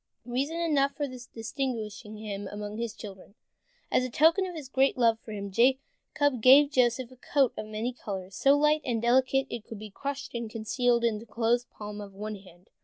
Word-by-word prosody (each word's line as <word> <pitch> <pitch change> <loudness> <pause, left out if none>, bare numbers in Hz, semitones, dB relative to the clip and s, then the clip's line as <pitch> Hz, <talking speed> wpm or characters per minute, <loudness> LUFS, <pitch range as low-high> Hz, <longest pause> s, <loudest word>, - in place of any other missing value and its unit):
Reason 275 +7 -2
enough 285 -5 +1
for 290 - -2
distinguishing 230 -3 -5
him 205 -2 -5
among 210 +2 -6
his 230 -1 -3
children. 195 -1 -11 0.6
As - - +3
a 255 - -2
token 325 +9 +4
of 360 - -7
his 300 -4 -7
great 270 +1 +2
love 230 -2 +3
for 220 - -11
him, 200 -1 -5
Jacob 265 - +1
gave 280 +4 +7
Joseph 250 -1 +2
a - - -14
coat 270 0 +1
of 215 - -6
many 220 +4 -3
colors, 195 -5 -6
so 275 +1 +4
light 300 +1 +3
and 235 -3 -1
delicate 260 +3 +2
that - - -3
it 225 - -16
could 225 - -7
be 210 0 -9
crushed 280 +5 -5
and 235 -2 -4
concealed 235 +2 0
in 225 -3 +1
the 230 - -13
closed 235 +3 0
palm 210 0 -8
of 200 -1 -10
one 210 +1 -5
hand. 185 -2 -18
235 Hz, 200 wpm, -28 LUFS, 215-270 Hz, 0.6 s, gave